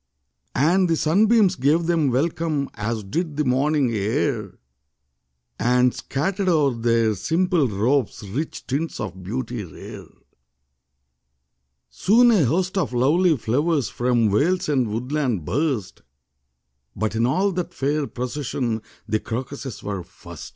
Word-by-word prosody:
And 175 +7 +3
the 165 - +3
sunbeams 200 +5 +3
gave 155 +4 +2
them 165 -4 +2
welcome. 150 +2 -1
As 110 0 -3
did 155 - -3
the 150 - +1
morning 135 +1 +2
air 110 0 -1 1.0
And 125 +1 +3
scattered 190 +7 -2
o'er 150 -6 +3
their 115 -1 +2
simple 165 - +1
robes 110 +1 0
Rich 140 +11 -4
tints 145 +5 -3
of 95 - -5
beauty 115 +3 -4
rare. 80 -6 -10 1.8
Soon 240 +5 +4
a 195 -10 +4
host 185 - 0
of 175 - -2
lovely 155 +7 +3
flowers 140 +4 0
From 120 -3 +1
vales 170 - +1
and 130 -5 +2
woodland 120 - -2
burst; 120 - -2 0.9
But 110 -1 -1
in 115 +2 +2
all 190 +9 +1
that 180 -1 -3
fair 145 +1 -1
procession 125 -3 -3 0.3
The 110 - 0
crocuses 130 +2 -6
were 100 -2 -3
first. 85 -2 -11
135 Hz, 125 wpm, -23 LUFS, 115-165 Hz, 1.8 s, Soon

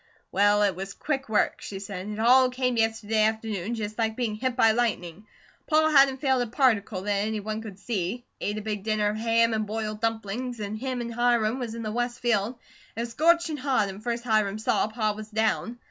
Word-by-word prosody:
"Well, 205 +1 +4
it 200 -3 +2
was 195 +1 -6
quick 270 -5 -3
work," 215 - +1
she 195 - -6
said. 195 -1 -6
"It 210 - -5
all 250 +3 +5
came 250 -1 -1
yesterday 225 -1 +1
afternoon 220 -1 -1
just 215 0 -5
like 220 -1 0
being 235 -3 -1
hit 250 +3 -2
by 225 -3 +5
lightning. 215 -5 -2 0.4
Pa 315 0 +4
hadn't 275 -2 +5
failed 265 -3 +2
a 245 - -1
particle 220 -6 +1
that 205 - -1 0.2
any 220 -1 -2
one 215 +1 -4
could 210 -4 -9
see. 205 +2 -3
Ate 205 +1 -2
a 215 - -5
big 210 -2 -3
dinner 215 0 +1
of 210 - -3
ham 230 0 +2
an' 215 -1 0
boiled 215 0 -4
dumplings, 225 +2 -2
an' 205 0 -4
him 250 +2 -3
an' 235 0 -4
Hiram 240 0 +1
was 235 -3 -4
in 230 - -5
the 215 - -3
west 240 +1 -2
field. 235 0 0 0.4
It 230 - -3
was 235 0 -4
scorchin' 335 +1 +3
hot 255 -7 +1
an' 195 +2 -8
first 235 +1 -3
Hiram 215 -3 +1
saw, 215 - +1
Pa 215 -1 -1
was 215 0 -9
down. 220 +2 0
220 Hz, 215 wpm, -26 LUFS, 210-245 Hz, 0.4 s, all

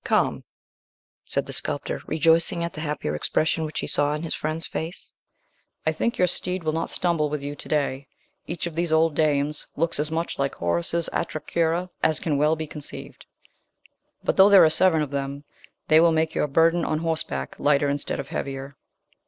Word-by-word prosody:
"Come," - - +1 0.8
said - - -2
the - - -6
sculptor, - - -2
rejoicing 165 +2 +3
at 170 - -3
the 155 - -6
happier 150 - -3
expression 155 - 0
which 155 - -4
he - - -3
saw 145 +1 +1
in 150 - -5
his 165 - -3
friend's 155 +1 -3
face. 165 +3 -5 0.7
"I - - +3
think 235 - -1
your 180 - +4
steed 180 0 -2
will 155 -1 0
not 165 +1 -2
stumble 165 -4 0
with 150 -1 -4
you 145 +1 -4
to 145 - -10
day. 140 -2 -1 0.4
Each 170 +1 -4
of 170 - -4
these 170 +1 -1
old 160 0 +3
dames 150 -1 0
looks 165 0 0
as 150 +1 0
much 165 -1 -3
like 140 0 -1
Horace's 85 - -1
Atra 155 -2 -2
Cura 170 +2 0
as 155 - +3
can 150 -4 -1
well 150 +2 +3
be 160 0 -4
conceived; 150 -1 -9 1.0
but, - - 0
though 195 +1 +8
there 200 -2 +8
are 160 - +5
seven 160 -2 +4
of 145 - -6
them, 140 0 -4 0.4
they 155 - +6
will 170 0 +5
make 160 0 +1
your - - 0
burden 165 +4 +3
on 155 - 0
horseback 155 - -1
lighter 145 0 +3
instead 140 0 -2
of - - -6
heavier." 135 0 -5
155 Hz, 195 wpm, -24 LUFS, 145-165 Hz, 1.0 s, though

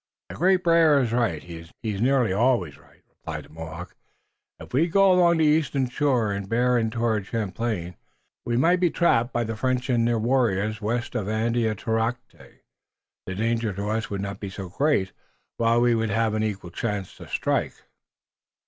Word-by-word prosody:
"The - - -8
Great 185 +2 +2
Bear 165 -4 +5
is 120 -4 0
right. 115 -11 0
He 85 -1 -9 0.3
is 105 -3 -3
nearly 125 -5 +2
always 105 - +1
right," - - -23
replied - - -8
the - - -20
Mohawk. 80 +2 -9 0.6
"If - - -12
we 155 +7 +3
go 195 +2 +4
along 175 -2 +4
the 160 - +3
eastern 150 -3 +2
shore 125 -6 +1
and 100 -1 -4
bear 125 +2 +2
in 115 -2 +1
toward 110 -3 -1
Champlain 105 -4 -3 0.5
we 120 0 -1
might 170 +7 +3
be 175 -1 +3
trapped 125 -9 +2
by 120 - 0
the 115 0 -4
French 130 +2 -1
and 115 -1 +2
their 120 -1 +1
warriors. 110 -3 0
West 120 +3 -2
of 110 -6 -2
Andiatarocte 115 +1 -1 0.9
the 95 - -4
danger 115 0 -1
to 100 +2 -4
us 110 +1 -2
would 100 -1 -3
not 100 0 -5
be 100 - -5
so 95 -1 -7
great, 135 - +1 0.5
while 115 0 +3
we 120 0 +3
would 115 -1 0
have 110 +1 +1
an 110 - 0
equal 100 -5 -3
chance 105 0 -4
to - - -11
strike." - - -1
115 Hz, 180 wpm, -25 LUFS, 105-125 Hz, 0.9 s, Bear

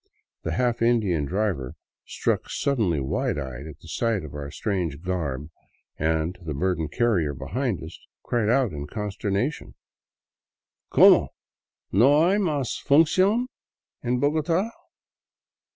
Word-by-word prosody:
The - - -3
half 120 -2 0
Indian 105 -10 +2
driver, 90 -7 -2 0.3
struck - - -1
suddenly 110 - 0
wide 65 +2 -1
eyed 65 0 -6
at 80 - -9
sight 100 +5 -1
of 75 - -10
our 70 -1 -6
strange 85 -3 -3
garb 75 -6 -3 0.4
and 80 +3 -1
the 80 -4 -5
burdened 85 0 -1
carrier 90 - +1
behind 95 - -2
us, 80 +2 -10 0.2
cried 115 -3 0
out 125 -3 +3
in 75 -1 -6
consternation: 105 - -3 0.6
" - - -67
Como! - - +7 0.6
No 140 - +5
hay 200 +3 +3
mas 150 - -1
f - - -27
uncion 185 - +4 0.6
en 125 0 +1
Bogota? 160 - +1
100 Hz, 125 wpm, -25 LUFS, 80-130 Hz, 0.6 s, Como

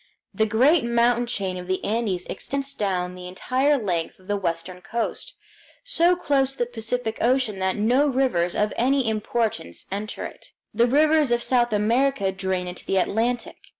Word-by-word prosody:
The 220 0 +1
great 260 +9 +4
mountain 235 0 +2
chain 190 -5 -2
of 180 - -8
the 185 0 -1
Andes 205 -5 -1
extends 275 0 -4
down 185 -5 -1
the 180 0 -9
entire 260 +10 +1
length 180 -8 -2
of 185 - -21
the 205 - 0
western 180 -1 -3
coast, 235 - -4 0.5
so 360 -8 +3
close 275 -6 +1
to - - -15
the 240 - +1
Pacific 230 -1 -3
Ocean 240 -5 +1
that 190 0 0
no 245 +7 +3
rivers 250 -11 +1
of 210 0 +1
any 265 +1 +2
importance 215 - -2
enter 205 +2 -4
it. - - -11 0.2
The 235 +3 +3
rivers 300 +1 +3
of 240 0 +2
South 240 -2 +2
America 220 0 +2
drain 190 -1 -2
into 180 0 -7
the 195 - 0
Atlantic. 230 +6 0
225 Hz, 170 wpm, -24 LUFS, 190-260 Hz, 0.5 s, great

